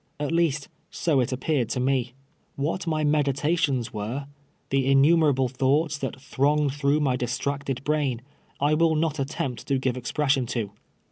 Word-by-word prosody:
At 145 0 -2
least, 165 -4 +1 0.2
so 155 -5 +1
it 125 - 0
appear 130 +2 0
ed 120 - -3
to - - -1
me. 125 -1 0 0.4
Wliat 160 +6 -2
my 155 -1 0
meditations 145 -3 +1
were 115 +7 -4 0.2
— - - -41
tlie 135 -1 +2
inniime 150 +3 +5
ralile 130 -2 0
tliouglits 140 +3 +1
that 135 - -3
thrcMigcd 140 +1 +1
through 145 +1 +1
my 135 -4 +2
distracted 135 +2 -2
brain 145 -5 0 0.2
— - - -36
I 145 +2 +2
will 160 0 +3
not 155 -1 0
attempt 135 -2 -3
to 135 - +2
give 130 -1 -1
expression 135 +1 0
to. 105 -4 -2
140 Hz, 175 wpm, -25 LUFS, 130-150 Hz, 0.4 s, inniime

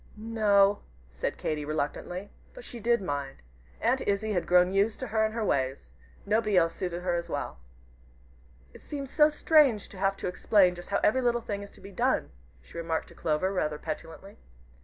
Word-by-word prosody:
"N 225 +2 -7
o!" 200 -1 +5 0.3
said - - -3
Katy, 150 -1 -2
reluctantly. 155 +6 -3 0.2
But - - -10
she 240 - -9
did 235 -1 +2
mind. 140 - -4 0.4
Aunt - - +1
Izzie 205 +2 0
had 180 - -1
grown 180 +1 +4
used 205 +3 +1
to - - -2
her 220 0 +2
and 220 0 -1
her 225 -2 -1
ways. 130 - -1 0.3
Nobody 215 -1 +2
else 165 -1 +3
suited 180 -2 -4
her 175 -1 0
so 170 - -13
well. - - -4 1.1
"It - - -14
seems 280 -2 -6
so 300 -1 +5
strange 295 -7 +3
to 195 - -11
have 195 0 +1
to - - -4
explain 185 0 +3
just 175 0 -10
how 200 - +1
every 260 +5 +3
little 240 -1 +2
thing 205 -3 -4
is 200 - -9
to - - -17
be 195 +1 -10
done," 185 - 0 0.3
she 170 - -9
remarked 165 -1 -2
to - - -14
Clover, 165 +5 0
rather 150 -5 -1
petulantly. 165 +6 -7
195 Hz, 195 wpm, -28 LUFS, 170-220 Hz, 1.1 s, o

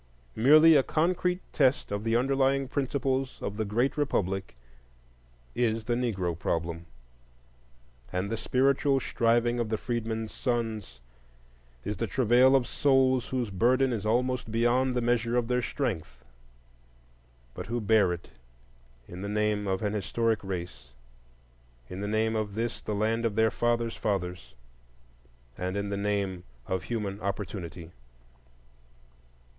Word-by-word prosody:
Merely 155 +7 +7
a 140 - +6
concrete 180 +5 0
test 135 -6 +2
of 100 +1 -2
the 115 0 +1
underlying 135 +2 +2
principles 135 -1 -1
of 100 - -4
the 110 - -1
great 120 +8 0
republic 95 - -1 1.0
is 115 -2 0
the 120 - -1
Negro 105 -8 -1
Problem, 85 0 -2 1.2
and 95 +3 -2
the - - 0
spiritual 135 +3 +2
striving 120 0 +1
of 115 -2 -1
the 110 - 0
freedmen's 115 -2 -3
sons 110 - -3 0.8
is 105 - -3
the - - -1
travail 130 +1 +4
of 130 -2 +3
souls 130 -2 +2
whose 125 -5 -2
burden 125 +6 +2
is 110 - -3
almost 125 +2 0
beyond 120 +3 +2
the 125 - +1
measure 120 0 +1
of 120 -2 +1
their 125 0 +1
strength, 80 - -4 1.3
but - - -7
who 120 +2 -2
bear 105 -3 +3
it 85 0 -6 0.8
in 90 +1 -9
the 100 - -4
name 105 -1 0
of 95 +2 -1
an 105 0 0
historic 110 +1 0
race, 85 -11 -6 1.0
in 95 - -5
the 105 - -2
name 110 +1 +1
of 105 -2 -2
this 115 +1 -2
the 105 - -3
land 110 +3 0
of 115 -3 0
their 110 0 +3
fathers' 120 -1 0
fathers, 90 -3 -3 1.0
and 90 +2 -2
in 100 0 -2
the 100 - -2
name 100 -3 -1 0.2
of 95 -1 -3
human 105 -4 -3
opportunity. 95 -4 -5
115 Hz, 140 wpm, -28 LUFS, 100-125 Hz, 1.3 s, Merely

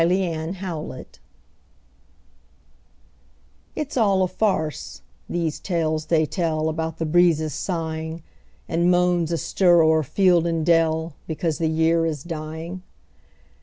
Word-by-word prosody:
MERRY 180 0 +1 0.3
AUTUMN 165 -4 -5 2.7
It's 305 -2 -4
all 200 -6 +3
a - - +2
farce, 185 -5 -2 0.3
these 165 -3 -2
tales 160 -3 -1
they 160 -2 +3
tell 160 -1 -1
About 160 0 -3
the 165 - -2
breezes 160 -2 +3
sighing, 160 -2 -4 0.4
And 170 +1 +1
moans 175 -2 +2
astir 170 +1 +3
o'er 160 0 +4
field 175 +3 +3
and 165 -2 -1
dell, 165 -1 +2
Because 160 -1 -2
the 160 -1 +1
year 165 +1 +2
is 150 -4 -4
dying. 165 +2 -6
165 Hz, 115 wpm, -23 LUFS, 160-175 Hz, 2.7 s, o'er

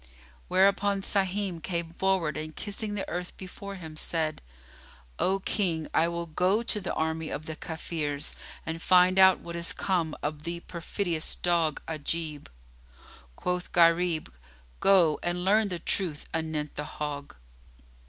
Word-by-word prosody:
Whereupon 195 +1 +3
Sahim 195 -3 0
came 170 -1 -3
forward 180 -4 +1
and 155 0 -5
kissing 205 0 -3
the 200 - -3
earth 180 +1 -4
before 195 +2 -8
him, 160 -4 -8
said, 155 0 -1 0.8
"O 195 +1 +2
King, 170 -6 0
I 165 - +4
will 170 0 -3
go 180 +7 +2
to 220 -3 -1
the 185 - -2
army 160 0 -1
of 155 - -4
the 160 - -5
Kafirs 155 -3 -3 0.3
and 165 0 -4
find 185 +1 +5
out 190 -1 +7
what 170 0 -7
is 170 -1 0
come 170 -5 0
of 150 0 -2
the 170 +2 -4
perfidious 170 -1 -2
dog 170 -3 +1
Ajib." 155 -1 -3 0.9
Quoth 180 - -2
Gharib, 170 - +4 0.5
"Go, 175 -6 +5
and 175 +1 -2
learn 210 +2 +4
the 180 -3 -3
truth 170 -2 -1
anent 155 -2 -2
the 150 - -4
hog." 145 -1 -4
170 Hz, 145 wpm, -29 LUFS, 160-190 Hz, 0.9 s, out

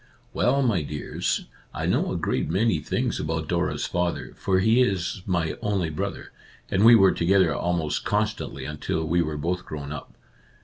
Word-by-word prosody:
" - - -34
Well, 140 0 +2
my 110 -9 +2
dears, 75 0 -3 0.3
I - - -2
know - - +1
a - - -1
great - - -1
many 95 0 +2
things 75 - -2
about - - -2
Dora's - - -1
father, 90 0 -2
for 95 -1 +1
he 110 +6 +4
is 95 -5 0
my 85 -4 0
only 95 -6 0
brother, 75 - -4 0.4
and 95 +2 +2
we 115 +1 +9
were 95 -4 +6
together 90 -2 +3
almost 85 -3 -1
con 105 +1 +2
stantly 105 - -6
until 75 +1 -3
we 85 +2 +2
were 75 -2 -2
both 90 +5 -2
grown 70 -2 -7
up. 75 - -8
90 Hz, 180 wpm, -25 LUFS, 80-100 Hz, 0.4 s, we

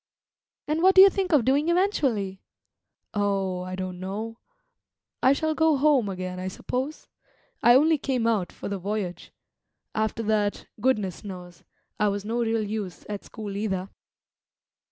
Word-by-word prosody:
"And 310 +2 0
what 380 +2 +5
do 380 - +10
you 395 - +7
think 380 -1 -1
of 285 -8 +4
doing 285 +5 +2
eventually?" 265 - +1 0.7
"Oh, 195 -3 0
I 185 0 -5
don't 185 -1 -5
know. 215 +5 -5 0.8
I 260 - +5
shall 315 +2 0
go 320 -1 +3
home 270 -6 +3
again, 185 -1 -5
I 185 - -4
suppose; 260 +9 -4 0.5
I 240 +1 +7
only 310 +3 +4
came 255 -4 -1
out 215 -6 +1
for - - -7
the 200 -1 -3
voyage. 195 -1 -4 0.6
After 220 +1 -1
that, 210 -1 0
goodness 210 -7 0
knows; 180 -3 -9 0.4
I 210 - +3
was 200 0 -2
no 230 +3 -1
real 225 -1 +1
use 205 -6 -5
at 205 -1 -4
school 210 -3 -7
either." 195 -2 -2
215 Hz, 155 wpm, -26 LUFS, 195-265 Hz, 0.8 s, do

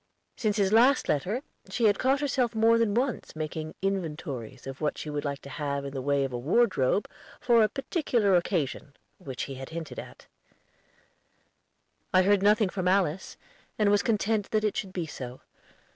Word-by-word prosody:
Since 215 -3 0
his 200 0 +2
last 255 +5 +5
letter, 195 - 0 0.3
she 235 - 0
had 205 -2 +4
caught 270 +2 +2
herself 250 -5 0
more 225 +1 +4
than 220 -3 +1
once 250 -6 -1
making 155 0 -5
inventories 155 - -3
of 135 +2 -7
what 150 - -1
she 150 - -5
would 145 0 -3
like 140 -1 -4
to 140 - -9
have 140 0 -3
in 140 - -6
the 135 - -3
way 140 +1 +1
of 135 -2 -3
a 120 - -2
wardrobe 175 - +2 0.3
for 235 -2 +4
a 215 - +4
particular 255 - +1
occasion, 155 -5 -1 0.2
which 130 -2 -5
he 135 - -5
had 135 0 -8
hinted 165 -2 -6
at. - - -11 1.9
I 185 0 +5
heard 200 +1 +3
nothing 210 0 +4
from 185 -1 -2
Alice, 185 -2 +1 0.4
and 210 -2 +3
was 205 0 +4
content 215 -2 0
that 215 -1 +1
it 210 - 0
should 190 - -3
be 180 -3 -3
so. 130 -5 -8
190 Hz, 180 wpm, -28 LUFS, 145-220 Hz, 1.9 s, last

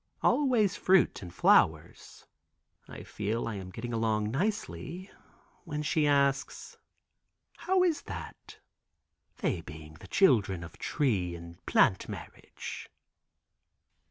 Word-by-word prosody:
"Always 245 -9 +3
fruit 190 -1 +3
and 90 -3 -8
flowers." 80 0 +2 0.6
I - - -9
feel 110 +3 -3
I 115 - -3
am 95 -2 -7
getting 115 +5 -6
along 110 -2 0
nicely. 175 - -3 0.5
When 150 -4 -4
she 150 0 +1
asks: 140 -1 0 0.8
"How 365 +2 +2
is 340 -4 +1
that? - - -8 0.8
they 165 - -1
being 80 -2 -11
the - - -12
children 100 - +3
of 85 - -12
tree 100 - 0
and 85 0 -12
plant - - +3
marriage." - - -8
115 Hz, 110 wpm, -30 LUFS, -, 0.8 s, Always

